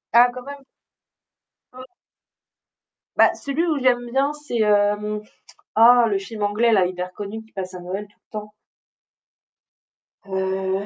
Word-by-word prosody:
Ah 240 +1 +8
quand 250 0 -8
même! 280 0 -9 1.1
O 255 - -9 1.3
Bah, - - +6
celui 280 +4 -2
où 310 -3 +1
j'aime 245 -2 +1
bien, 275 +3 +1
c'est, 295 -6 -3
hem, 210 0 +2 0.6
oh, 240 +2 +7
le 205 - 0
film 210 +2 -7
anglais-là, 210 -2 +3
hyper 180 0 -5
connu, 210 +3 -7
qui 220 - -23
passe 185 -1 -6
à 180 - -7
Noël 190 +4 -5
tout 205 - -30
le - - -75
temps. 210 0 -10 1.7
Heu 190 0 -2
210 Hz, 140 wpm, -22 LUFS, 195-245 Hz, 1.7 s, Ah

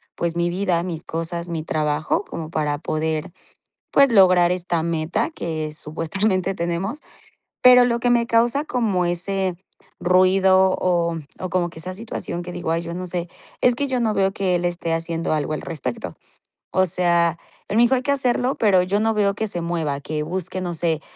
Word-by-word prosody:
pues 170 -1 -2
mi 170 0 +1
vida, 180 -1 0
mis 170 -2 -5
cosas, 170 +1 -4
mi 165 -2 -3
trabajo, 155 -1 0
como 160 -1 -7
para 150 -2 -1
poder 155 +2 -2 0.6
pues 275 -2 +5
lograr 185 -4 +6
esta 175 -2 -1
meta 170 +6 -1
que 155 - -4
supuestamente 185 +6 -1
tenemos, 180 - -3 0.6
pero 250 0 +8
lo 235 -1 +1
que 245 +1 +2
me 235 -1 +2
causa 235 +5 +2
como 220 - 0
ese 185 +1 -1 0.4
ruido 185 +1 +4
o 170 -2 +1 0.2
o 185 - -4
como 175 -1 0
que 165 - -11
esa 185 +3 -6
situación 195 -4 -5
que 180 0 -7
digo: 160 - -3
"Ay 165 +1 0
yo 170 0 -6
no 180 +1 -5
sé", 175 -1 -3 0.3
es 250 -1 +3
que 280 +3 -1
yo 260 -2 -1
no 225 -3 +1
veo 195 -1 +2
que 190 -2 0
él 175 - -1
esté 175 -1 -1
haciendo 165 0 -2
algo 155 -1 -1
al 155 - -3
respecto, 135 -7 -5 0.6
o 185 - +3
sea, 170 -2 +1 0.3
él 205 - -1
me - - +6
dijo: 245 +2 +4
"Hay 255 - -1
que 280 - +1
hacerlo", 255 -1 +1
pero 195 -5 +3
yo 195 +3 0
no 225 +1 +2
veo 200 -1 +2
que 220 +2 -2
se 175 -4 -3
mueva, 165 -4 -2
que 150 +1 -3
busque, 185 +3 -4
no 175 -2 -3
sé, 160 -1 0
180 Hz, 195 wpm, -22 LUFS, 165-200 Hz, 0.6 s, pero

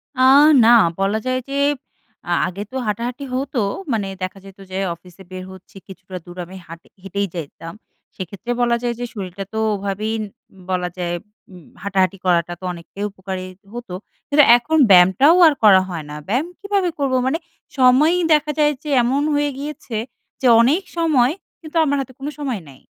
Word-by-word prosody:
আ - - -8 0.5
না, - - +6 0.3
বলা 195 +2 +1
যায় 255 0 0
যে 275 - -3 0.7
আ - - -1 0.2
আগে 190 +3 -5
তো - - -10
হাঁটাহাঁটি 235 +6 -3
হতো। 265 -1 -2 0.3
মানে 205 -3 -1
দেখা 185 +1 -4
যেত 195 0 -13
যে, 185 - -4 0.2
অফিসে 180 +2 -16
বের 185 0 -6
হচ্ছি, 190 +1 -15
কিছুটা 190 -1 -9
দূর 175 +1 -12
আমি 185 +2 -12
হাঁট 165 0 -10 0.2
হেঁটেই 200 +1 -2
যাইতাম। 165 +1 -7 0.4
সেক্ষেত্রে 200 +6 -6
বলা 240 -1 +3
যায় 240 -1 0
যে, 245 - -2
শরীরটা 195 -2 -6
তো - - -4 0.2
ওভাবেই 200 +2 -3 0.4
উ - - -20
বলা 180 -1 -1
যায় 175 -1 -2 0.4
উম 180 -3 -14 0.2
হাঁটাহাঁটি 195 -1 +1
করাটা 175 -1 +2
তো - - -18
অনেকটাই 175 +4 -9
উপকারী 190 -1 -6 0.3
হতো। 240 -6 -7 0.3
কিন্তু 290 +1 +5
এখন 310 +7 -1
ব্যায়ামটাও 190 - +6
আর 310 - +4
করা 195 -3 +7
হয় 170 -3 -5
না। 150 - -7
ব্যায়াম 250 - 0
কীভাবে 400 -2 0
করবো, 270 -2 +1
মানে 270 - +1 0.4
সময়ই 280 +7 +4
দেখা 300 0 +2
যায় 295 0 +4
যে, 305 - -6
এমন 265 +4 +1
হয়ে 290 0 +1
গিয়েছে 280 -4 -7 0.5
যে, 260 - +3
অনেক 295 +11 +2
সময় 290 -7 +3 0.3
কিন্তু 320 0 -5
আমার 285 -2 +1
হাতে 260 -1 -9
কোনো 285 +2 -4
সময় 260 -9 -3
নাই। 135 -1 -16
210 Hz, 175 wpm, -20 LUFS, 185-275 Hz, 0.7 s, করা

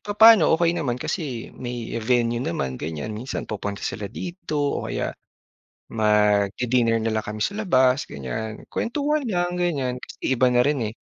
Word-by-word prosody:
papaano 210 -3 +7
okey 170 0 +2
naman 125 -5 -1
kasi 125 -4 -4
may 120 -2 -6
venue 120 0 +1
naman 130 - -3
ganyan 80 +7 -4
minsan 120 +5 -4
pupunta 100 -1 -5
sila 100 -2 -3
dito 170 -4 -5 0.2
o - - -5
kaya - - -2 0.8
magdi-dinner 110 +2 +2
na 115 - 0
lang 110 -1 -1
kami 105 0 -5
sa - - 0
labas 130 -7 +3
ganyan 75 - -5
kwentuhan 290 +2 -1
lang 180 -3 -1
ganyan 135 -8 -1
kasi - - -11 0.2
iba 130 +1 +4
na 125 0 +4
rin, 145 0 +1
eh. 110 - -6
125 Hz, 155 wpm, -24 LUFS, 110-165 Hz, 0.8 s, papaano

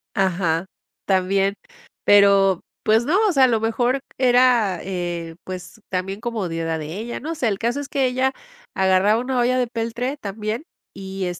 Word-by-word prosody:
Ajá, 175 -3 +1 0.4
también, 195 +1 +2 0.5
pero, 200 -2 +5 0.2
pues, 220 +2 +3
no, 345 +6 +2
o 395 - +3
sea, 270 -4 +4
a - - +4
lo 225 -2 +1
mejor 240 +4 0 0.2
era, 245 -7 +3
eh, 175 -3 -4
pues 185 +3 -8
también 195 +1 -3
comodidad 165 -9 -2
de 155 +4 -6
ella, 235 +2 -5
no 325 +4 -5
sé, 250 - 0
el 200 -2 -1
caso 240 +4 -1
es 285 - -5
que 270 -2 +1
ella 260 +1 +1 0.4
agarraba 190 +3 +3
una 255 0 -1
olla 250 +1 +2
de 245 - +1
peltre 235 +4 -3
también, 215 +2 -4 0.3
y 195 -1 -5
210 Hz, 165 wpm, -22 LUFS, 190-245 Hz, 0.5 s, pero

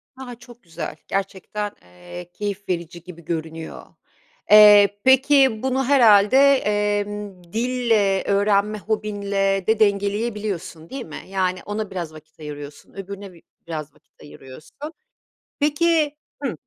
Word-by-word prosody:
A! 260 -2 -9
Çok 240 0 -17
güzel, 165 -3 -7
gerçekten, 195 +2 -4
eee, 90 - -12
keyif 205 -1 -5
verici 170 -1 -4
gibi 170 -2 -13
görünüyor. 160 -1 -6 0.7
Eee, 205 -1 +8
peki, 265 -3 +4
bunu 265 0 0
herhâlde, 230 -4 +5 0.2
emm, 205 -3 -2
dille, 225 -5 +1
öğrenme 200 +1 +1
hobinle 200 -2 -1
de 220 0 +2
dengeleyebiliyorsun 205 -5 -1
değil 270 -2 -6
mi? 155 - -9
Yani, 185 -1 -1
ona 210 0 -4
biraz 170 -4 -5
vakit 155 +1 -16
ayırıyorsun, 145 -1 -10
öbürüne 195 0 -8
bi 170 - -18 0.3
biraz 155 -3 -6
vakit - - -28
ayırıyorsun. 135 +1 -14 0.8
Peki 300 0 +1 0.3
Hıh. 270 - -1
200 Hz, 120 wpm, -22 LUFS, 175-220 Hz, 0.8 s, Eee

